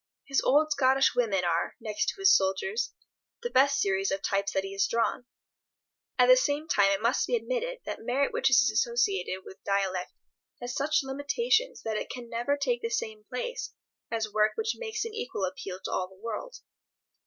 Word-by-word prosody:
His 275 -1 +1
old 305 +3 +3
Scottish 270 -1 +3
women 210 -7 +1
are, 170 0 0
next 215 -2 -2
to - - -4
his 385 0 +7
soldiers, 195 - 0 0.5
the 480 - -3
best 275 +1 +4
series 195 -2 +1
of 195 0 -2
types 200 0 0
that 190 - +1
he 195 - -6
has 195 0 +1
drawn. 235 +1 -1 0.9
At - - +6
the - - +8
same 300 -9 0
time 200 - +4
it 200 +2 -1
must 235 +4 +2
be - - +1
admitted - - -3
that - - -5
merit 255 +4 0
which - - +2
is 260 0 +5
associated 210 -5 0
with 190 +1 -13
dialect 190 -2 -1 0.5
has 245 0 -5
such 300 +2 +1
limitations 445 - 0
that 220 -1 -2
it - - -4
can 245 -2 -7
never 240 +5 0
take 250 -4 0
the 230 - -2
same 220 -2 -3
place 485 - -5 0.3
as 220 -2 -2
work 215 0 +3
which 450 0 -1
makes 445 -1 -4
an 455 - -6
equal 445 - -3
appeal 185 0 -6
to - - -4
all 185 - -1
the 190 - -18
world. 230 - -5
245 Hz, 190 wpm, -28 LUFS, 200-300 Hz, 0.9 s, the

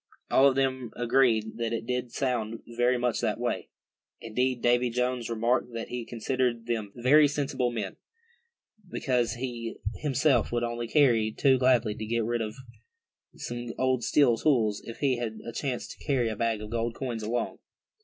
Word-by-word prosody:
All 135 - +6
of 135 - +2
them 130 -3 0
agreed 120 -3 +2
that 115 -1 -2
it 115 0 -3
did 125 0 -2
sound 115 -4 -2
very 120 +2 +1
much 120 -1 0
that - - -1
way. - - -2 0.5
Indeed, 125 +2 -1
Davy 120 +1 +3
Jones 125 0 -1
remarked 120 +2 0
that 115 0 -5
he 125 -1 -4
considered 120 0 -1
them 110 -4 -2
very 145 +5 +5
sensible 140 -3 -1
men, 110 -5 -4 0.9
because 125 -7 0
he 120 -2 -5 0.2
himself 135 -2 +2
would 120 0 0
only 120 0 -3 0.5
too 130 -2 +4
gladly 125 -4 +3
get 110 +2 -2
rid 120 0 -1
of 110 -1 -4 0.8
some 120 -1 -5
old 130 -2 +1
steel 125 -6 +4
tools, 115 -7 +2
if 115 - -8
he 135 -4 +2
had 115 -2 -4
a 115 - -5
chance 130 -2 -3
to - - -11
carry 130 -5 +1
a 110 - -3
bag 115 -1 -1
of 105 - -8
gold 115 0 -1
coins 120 -4 -4
along. 115 +2 -2
120 Hz, 165 wpm, -28 LUFS, 115-130 Hz, 0.9 s, All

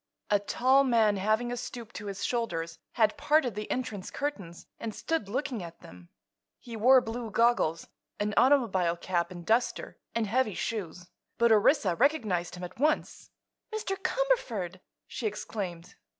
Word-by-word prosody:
A 205 - +5
tall 260 +6 +3
man, 225 -5 +3
having 215 +5 +1
a - - -1
stoop 235 -2 -7
to 210 - -7
his 195 -1 -4
shoulders, 170 -9 -2
had 220 0 +3
parted 290 -4 +2
the 210 +1 -5
entrance 215 -7 -3
curtains 200 - -5
and 225 -2 -5
stood 325 -12 -2
looking 255 -1 -2
at 170 -1 -10
them. 90 -1 -14 0.5
He 235 -2 -9
wore 255 +4 +6
blue 230 0 -5
goggles, 230 -8 +2 0.3
an 210 0 -1
automobile 195 -11 +3
cap 170 -1 -1
and 175 -2 -9
duster, 230 +4 0 0.2
and 230 -1 +1
heavy 220 0 +1
shoes; 180 -5 -4 0.3
but 235 -1 +4
Orissa 215 - +4
recognized 215 - +1
him 180 - -8
at 180 - -8
once. 305 +2 0 0.4
"Mr. 430 -3 -2
Cumberford!" 245 - -1 0.3
she 245 -4 -3
exclaimed. 190 -4 -5
220 Hz, 150 wpm, -29 LUFS, 185-250 Hz, 0.5 s, wore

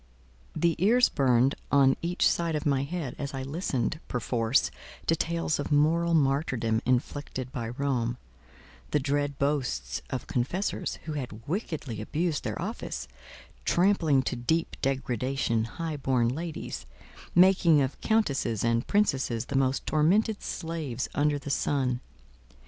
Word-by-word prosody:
The 170 +1 +2
ears 240 +5 +5
burned 130 -1 +3 0.2
on 135 -1 +5
each 175 +1 +2
side 170 -2 +1
of 150 - -2
my 140 -2 +2
head 145 -1 -4
as 140 -1 -4
I 135 - -3
listened, 145 0 -2
perforce, 120 0 +1 0.3
to 165 - +3
tales 165 -2 -1
of 145 - -3
moral 165 +3 +3
martyrdom 135 -6 +1
inflicted 130 0 -1
by 115 -2 -4
Rome; 120 -2 -1 0.7
the - - +2
dread 145 0 -1
boasts 125 - -1
of 130 - -3
confessors, 150 +11 -1
who 155 - -4
had 120 -6 -6
wickedly 150 - -3
abused 155 +7 -1
their - - -3
office, - - -4 0.6
trampling 170 -7 +3
to 125 - -2
deep 160 +8 0
degradation 130 -3 0
high 160 +5 -4
born 130 -4 +1
ladies, 160 +5 -5 0.5
making 180 -3 +6
of 135 -1 -1
countesses 140 - +1
and 115 0 +1
princesses 135 - +1
the - - -5
most 135 0 +1
tormented 200 +8 +2
slaves 160 -8 -4
under 145 0 +2
the 140 0 -5
sun. 130 -3 0
140 Hz, 135 wpm, -28 LUFS, 125-165 Hz, 0.7 s, making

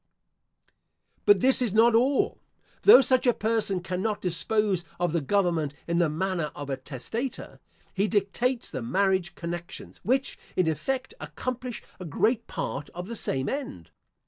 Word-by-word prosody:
But 205 -1 +6
this 260 +1 +5
is 225 -5 0
not 230 +1 +6
all. 255 +4 +2 0.4
Though 340 -10 +9
such 260 -1 +2
a 245 - +4
person 215 -4 0
cannot 190 +4 -2
dispose 190 +2 0 0.2
of 175 -2 0
the 170 - +1
government 165 -3 0
in 170 0 +1
the 170 -3 +3
manner 170 0 -2
of 145 -1 -6
a 135 - -1
testator, 150 - -5 0.3
he 200 +2 +1
dictates 230 +5 0
the 130 - -4
marriage 190 +7 +1
connections, 170 +2 -7
which, 265 +4 0 0.2
in 180 - +2
effect, 260 - -2
accomplish 245 +11 -5 0.2
a 185 - -7
great 220 - 0
part 145 +1 -4
of 180 +1 -5
the 235 - -5
same 135 -10 -1
end. 265 - -5
195 Hz, 150 wpm, -27 LUFS, 170-235 Hz, 0.4 s, Though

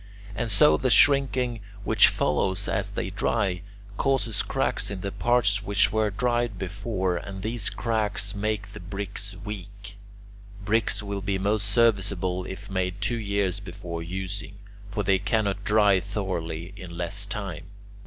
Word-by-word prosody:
And 115 +2 -2
so 85 -6 +5
the 130 - 0
shrinking, 130 -3 +4 0.2
which - - +7
follows 95 +5 +1
as - - 0
they - - -3
dry, 95 -6 0 0.4
causes 130 -6 +1
cracks - - -1
in 100 -2 -5
the 100 - -3
parts 115 -4 +3
which 100 0 +2
were 110 -1 +2
dried 120 0 0
before, 95 -1 -2
and 95 +2 -7
these 115 +1 -1
cracks 105 -3 -1
make 105 -1 -2
the - - -8
bricks 100 +2 -5
weak. 100 0 -8 0.7
Bricks 105 -1 +1
will 100 -1 -4
be 95 0 -1
most 100 +1 0
serviceable 100 -5 +2
if 100 +2 -8
made 95 -1 -2
two 115 +3 +1
years 100 -3 0
before 90 -3 -6
using; 95 +4 -4 0.3
for 105 +1 -2
they 95 0 +3
cannot 105 -1 0
dry 105 -2 +4
thoroughly 90 -3 -4
in 90 -4 -9
less 100 +4 0
time. 100 -5 -5
100 Hz, 145 wpm, -26 LUFS, 95-110 Hz, 0.7 s, which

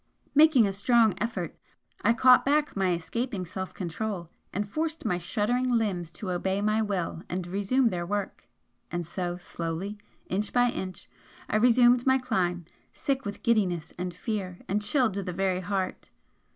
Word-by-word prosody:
Making 295 -5 +6
a 195 - -1
strong 220 +1 +4
effort, 195 -7 -3 0.5
I 220 - +4
caught 250 +2 +6
back 295 +2 +1
my 190 -2 +2
escaping 200 +4 -3
self 190 +2 -5
control, 180 -1 -4 0.2
and 205 +1 -2
forced 320 +6 -3
my 180 -5 +1
shuddering 240 +8 0
limbs 190 -8 0
to 190 -3 -4
obey 190 +2 0
my 215 +2 +2
will 190 -6 -2
and 180 0 -3
resume 205 +8 +1
their 175 -4 -2
work 200 +2 -4 0.4
and 175 -1 -2
so, 175 +1 -3
slowly, 175 +4 -5 0.3
inch 205 +3 -1
by 245 0 +4
inch, 185 -4 -6 0.4
I - - -2
resumed 245 +2 +5
my 260 0 +6
climb, 180 -9 -1 0.3
sick 270 -2 -2
with 200 0 -6
giddiness 190 -8 +1
and 180 0 -3
fear 185 -1 -4
and 205 +2 0
chilled 230 +1 +2
to 200 - -2
the 180 -2 -4
very 190 0 0
heart. 185 0 -3
200 Hz, 165 wpm, -28 LUFS, 180-235 Hz, 0.5 s, Making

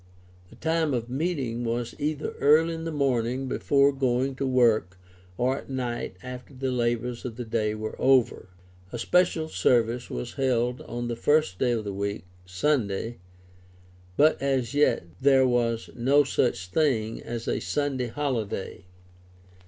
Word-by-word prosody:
The - - -15
time 160 -3 0
of 120 0 -4
meeting 135 -6 -2
was 120 0 -2
either 150 0 -2
early 160 +3 +4
in 165 0 -5
the 165 - -3
morning 130 -3 0
before 140 +2 +3
going 130 0 0
to 135 - -1
work 115 -8 +2 0.4
or 130 +3 +1
at - - -14
night 125 -3 -3
after 125 +2 -9
the 130 0 -2
labors 120 0 -1
of 120 -3 -5
the 120 0 -5
day 110 -1 -1
were 110 0 -5
over. 130 -7 +3 0.4
A - - -4
special 170 +4 +2
service 120 -4 +1
was - - -5
held 125 -2 0
on 120 0 -4
the 120 - -2
first 145 -6 +1
day 125 -2 +2
of 115 -2 -2
the 100 -1 -4
week 100 -2 -3 0.2
(Sunday)., 105 +1 -1 1.0
but 155 +2 +4
as 135 -3 0
yet 145 - +3 0.2
there 135 -1 +5
was 115 -2 0
no 135 +5 +4
such 120 -8 0
thing 115 - 0
as 115 -1 -6
a - - 0
Sunday 140 -4 -1
holiday. 115 -9 -3
125 Hz, 155 wpm, -26 LUFS, 115-140 Hz, 1.0 s, there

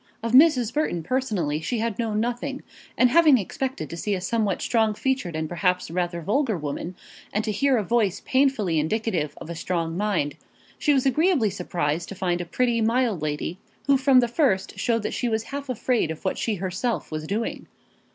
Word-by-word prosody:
Of 230 - -1
Mrs. 255 -4 +5
Burton 295 - -1
personally 185 - -1
she 240 +9 -2
had 225 -1 -2
known 220 -2 0
nothing, 245 +4 -3 0.3
and 250 -1 +5
having 315 -3 +6
expected 250 - -3
to - - -4
see 200 +4 -1
a - - -3
somewhat 205 0 -1
strong 220 -2 +2
featured 260 -10 -1
and 160 0 -2
perhaps 180 0 0
rather 175 -1 -2
vulgar 220 - +1
woman, 155 +4 -5 0.4
and 210 - 0
to 215 - -1
hear 270 +4 +2
a 215 - 0
voice 210 -2 +1
painfully 260 - +2
indicative 170 -3 -1
of - - -9
a 170 - -5
strong 165 -1 -2
mind, 190 -7 -1 0.4
she 300 - +2
was 270 -2 +2
agreeably 275 - +3
surprised 170 -3 -2
to 195 - -7
find 180 -2 -1
a - - -4
pretty, 235 +5 +1
mild 230 - +1
lady, 155 +4 -3 0.3
who 280 - +5
from 265 -1 +5
the 240 - +1
first 235 - 0
showed 230 -3 +1
that - - -2
she 245 - -1
was 220 -1 0
half 280 +2 -6
afraid 245 -6 0
of 160 - -7
what - - -1
she 220 - 0
herself 190 +6 -2
was 155 0 -4
doing. 215 +5 -3
215 Hz, 195 wpm, -25 LUFS, 175-255 Hz, 0.4 s, having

